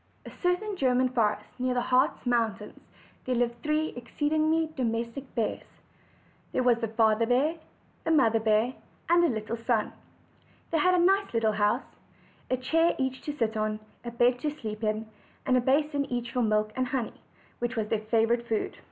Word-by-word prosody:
a - - -7
certain 385 +3 0
German 255 -2 +2
forest 220 -4 +1 0.2
near 255 0 0
the 245 - +2
Hartz 255 +4 +1
mountains 225 -4 -1 0.5
there 255 - 0
lived 235 0 -1
three 305 +1 0
exceedingly 310 +5 0
domestic 235 +2 -3
bears. 230 -3 -2 0.9
There 255 - +1
was 245 -2 +4
the 225 - 0
Father 220 0 +2
bear, 270 +7 +2 0.5
the - - -2
Mother 235 -8 +4
bear, 220 +3 +2 0.4
and 345 0 +5
a - - +5
little 225 -3 -3
son. 225 -4 +1 0.8
They 325 - +2
had 365 +4 +4
a 350 -1 +4
nice 390 +2 +2
little 225 -1 +3
house; 210 +4 0 0.5
a 255 - +1
chair 325 +7 +2
each 265 -1 -2
to 295 -1 -4
sit 225 -3 0
on, 215 0 -1 0.2
a 240 - -4
bed 240 +1 +2
to 300 - -1
sleep 225 -7 -6
in, 215 +1 -1 0.4
and 255 - +3
a 250 - +4
basin 285 +2 +1
each 240 -2 -3
for 250 - 0
milk 215 -1 +1
and 255 0 0
honey, 250 -3 -2 0.5
which 240 +1 -2
was 215 -2 -2
their 220 -2 0
favorite 235 +1 +2
food. 220 -2 -1
245 Hz, 180 wpm, -28 LUFS, 225-285 Hz, 0.9 s, and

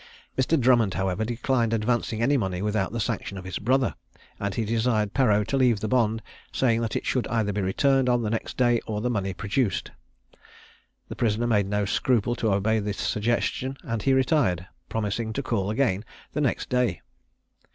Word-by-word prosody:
Mr. 135 +4 +2
Drummond, 120 -6 +3
however, 95 +2 -1
declined 120 0 0
advancing 115 0 0
any 140 +4 +3
money 95 -6 -1
without 105 -2 0
the 115 - -3
sanction 100 -1 -3
of 95 - -7
his 95 - -4
brother, 130 +3 +2 0.5
and 100 -1 -2
he 115 - -1
desired 110 -2 +1
Perreau 105 -6 +3
to 135 - -1
leave 125 -5 +3
the 110 - -2
bond, 115 -2 +1 0.3
saying 115 -3 +2
that 115 - -2
it - - -2
should 125 - 0
either 110 -3 0
be 105 - -1
returned 130 +7 +2
on 120 -1 +2
the 105 - -1
next 115 - -3
day, 120 -2 +3
or 105 -1 -2
the 125 +3 -1
money 100 -4 -1
produced. 105 +5 -1 1.2
The - - -7
prisoner 115 0 0
made 105 -4 +2
no 105 0 0
scruple 120 +2 +1
to 110 - +1
obey 110 +3 +2
this 105 -1 -3
suggestion, 120 +4 -1
and 115 -1 -3
he 135 - +2
retired, 130 - +2 0.2
promising 110 +1 -2
to 140 - -2
call 100 -6 -1
again 110 -4 +1 0.3
the 150 - -1
next 135 - -1
day. 125 -7 +1
115 Hz, 185 wpm, -26 LUFS, 105-125 Hz, 1.2 s, Drummond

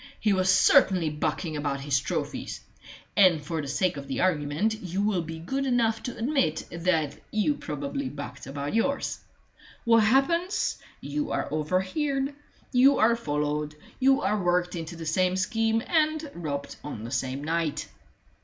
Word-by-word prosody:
He 210 -2 +2
was 185 0 +2
certainly 180 -3 +5
bucking 155 +2 -2
about 145 -2 -2
his 140 -1 +1
trophies, 135 - -4 0.5
and 185 -5 +6
for 160 +1 -2
the 140 - -6
sake 180 +3 0
of 140 0 -7
the 135 - -3
argument 165 +3 +1
you 190 +2 -2
will 205 -4 +1
be 165 0 -6
good 265 +13 -2
enough 230 -4 +1
to 245 - -6
admit 225 - 0
that 165 -4 0
you 215 +7 +1
probably 280 -1 -4
bucked 140 -3 -8
about 140 +1 -4
yours. 275 +5 0 0.7
What 230 -1 +5
happens? 335 - +2 0.2
You 295 0 -3
are - - -1
overheard; 230 - 0 0.4
you 265 +2 +5
are 230 +2 +4
followed; 150 -5 -2 0.2
you 270 +1 +4
are 210 -1 +1
worked 180 0 +1
into 165 0 -5
the 165 0 -7
same 180 +4 +2
scheme, 225 +3 +1
and 310 -2 +1
robbed 145 -4 -5
on 115 -7 -6
the 115 - -6
same 135 +1 -2
night." 165 -1 -1
185 Hz, 155 wpm, -27 LUFS, 150-235 Hz, 0.7 s, and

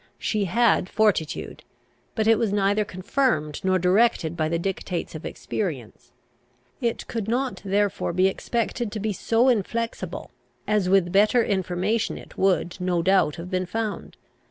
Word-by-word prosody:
She 210 -2 -1
had 210 -1 +2
fortitude; 210 -8 0 0.5
but 220 -3 0
it 225 -1 +4
was 220 -3 +1
neither 205 +1 +2
confirmed 185 - -1
nor 185 0 +3
directed 185 -2 +2
by 155 -2 0
the 170 - 0
dictates 180 0 -3
of 155 - -6
experience. 125 - -5 0.7
It 235 -2 -1
could 225 -3 -4
not 250 +3 -1
therefore 200 -1 0
be 185 +2 +2
expected 235 +3 -2
to 215 - -3
be 210 0 -1
so 230 +6 +2
inflexible, 230 0 -2 0.4
as 210 -3 +1
with 185 -2 +3
better 215 +5 +4
information 190 +3 -1
it - - -13
would, 185 -2 +1
no 180 -2 0
doubt, 190 -5 +3
have 175 +2 -8
been 185 -1 -1
found. 220 +2 -4
195 Hz, 150 wpm, -24 LUFS, 180-225 Hz, 0.7 s, it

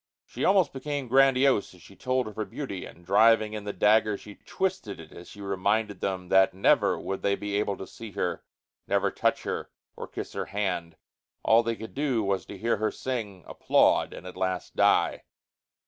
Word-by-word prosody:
She - - -6
almost 190 -5 +3
became 140 0 -4
grandiose 135 -4 +3
as 90 - -18
she 100 - -15
told 130 +1 -1
of 105 - -9
her 110 - -2
beauty, 100 -10 -6
and, 85 - -16
driving 110 +3 +4
in 105 -1 -6
the 105 - -2
dagger, 105 0 +3
she 105 - -12
twisted 185 - -3
it 80 -1 -12
as 85 - -12
she 105 - -12
reminded 100 +1 -1
them 95 -2 -3
that 95 -1 +4
never 95 - +3
would 95 - -4
they 100 - +1
be 105 0 -4
able 100 -2 -1
to 95 - -7
see 115 +3 -10
her, - - -2 0.4
never - - +1
touch - - 0
her - - -4 0.3
or - - -7
kiss - - -7
her - - -3
hand. 90 -5 -3 0.5
All 115 +1 +5
they 115 0 -2
could 110 0 -9
do 135 -6 0
was 100 -1 -1
to 100 - -8
hear 115 +4 0
her 110 +1 0
sing, 105 -8 -5
applaud - - +2
and - - -10
at 90 - -8
last 95 -1 -3
die. - - +3
105 Hz, 195 wpm, -27 LUFS, 95-120 Hz, 0.5 s, All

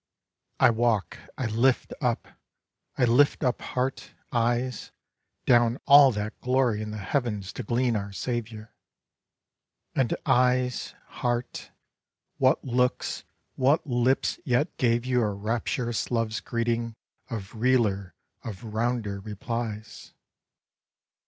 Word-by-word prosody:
I - - +6
walk, 115 -3 0 0.2
I 130 - -2
lift 120 +4 +1
up, 125 -3 0 0.7
I 125 - +4
lift 135 +6 +3
up 125 -2 0
heart, 130 +1 -3 0.2
eyes, 120 +1 0 0.6
Down 120 -1 +4
all 140 -1 +8
that 105 +1 -5
glory 125 -4 +1
in 105 - -5
the 105 - -5
heavens 105 -1 -2
to - - -5
glean 120 +1 0
our 100 -1 -3
Saviour; 115 0 -5 1.2
And, 130 -4 +1
éyes, 125 0 +2 0.3
heárt, 120 0 -2 0.7
what - - +3
looks, 125 0 0 0.3
what 140 +6 +2
lips 125 0 +1
yet 130 -1 0
gave 120 -1 +2
you 125 -1 +2
a 105 -2 +1
Rapturous 115 +3 -2
love's 115 -2 0
greeting 115 -1 -2 0.3
of 105 -6 -6
realer, 110 -7 +1 0.3
of 105 -4 -7
rounder 110 -3 -1
replies? 110 +1 -6
120 Hz, 115 wpm, -27 LUFS, 110-125 Hz, 1.2 s, all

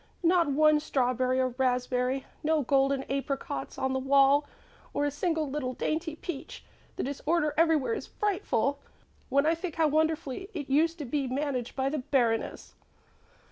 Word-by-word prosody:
Not 340 -1 +4
one 305 +2 +4
strawberry 255 -3 0
or 255 0 +2
raspberry, 250 +1 0 0.2
no 310 -1 +1
golden 275 +1 +2
apricots 270 - -4
on 265 0 -1
the 265 - 0
wall 275 +2 +4 0.5
or 290 - +1
a 290 - 0
single 320 +1 -1
little 265 -2 -3
dainty 315 +4 -2
peach. 315 -3 -7 0.3
The - - -3
disorder 300 +3 0
everywhere 325 - +3
is - - -5
frightful. 285 - -1 0.5
When 280 +2 +3
I 320 - +4
think 335 -1 -5
how 320 -2 +3
wonderfully 315 +3 -1
it 285 -3 -5
used 325 +4 +3
to 300 - -5
be 275 +2 -1
managed 255 -2 -2
by 265 0 0
the 300 +1 -2
Baroness!" 240 -4 0
280 Hz, 155 wpm, -29 LUFS, 265-315 Hz, 0.5 s, Not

